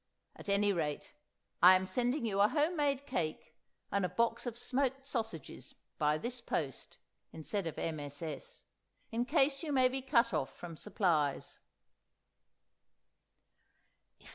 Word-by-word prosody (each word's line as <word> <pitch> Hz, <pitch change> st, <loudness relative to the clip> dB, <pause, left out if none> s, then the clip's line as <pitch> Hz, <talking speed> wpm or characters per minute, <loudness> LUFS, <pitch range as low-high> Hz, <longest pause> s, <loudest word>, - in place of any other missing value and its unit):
At -, -, -9 dB
any 200 Hz, 0 st, +3 dB
rate, 150 Hz, -5 st, -3 dB, 0.5 s
I'm 185 Hz, +1 st, +8 dB
sending 245 Hz, +6 st, 0 dB
you 200 Hz, -3 st, +1 dB
a 205 Hz, -, +7 dB
home 305 Hz, +7 st, +1 dB
made 285 Hz, -3 st, 0 dB
cake 155 Hz, -, -3 dB, 0.4 s
and 200 Hz, -1 st, +1 dB
a 180 Hz, -, +1 dB
box 235 Hz, +2 st, 0 dB
of 235 Hz, -1 st, -4 dB
smoked 265 Hz, +2 st, -1 dB
sausages 225 Hz, -, -5 dB, 0.2 s
by 150 Hz, 0 st, +3 dB
this 240 Hz, +7 st, -5 dB
post 140 Hz, -, -3 dB, 0.3 s
(instead 170 Hz, +4 st, -3 dB
of 160 Hz, -, -5 dB
MSS.) 155 Hz, -, -4 dB, 0.5 s
in 235 Hz, +2 st, 0 dB
case 275 Hz, -1 st, +2 dB
you 315 Hz, -3 st, -3 dB
may 260 Hz, -2 st, +5 dB
be 265 Hz, +1 st, -3 dB
cut 245 Hz, -5 st, +3 dB
off 150 Hz, -4 st, -2 dB
from 170 Hz, -2 st, -8 dB
supplies." 160 Hz, -7 st, 0 dB
210 Hz, 130 wpm, -34 LUFS, 165-265 Hz, 0.5 s, I'm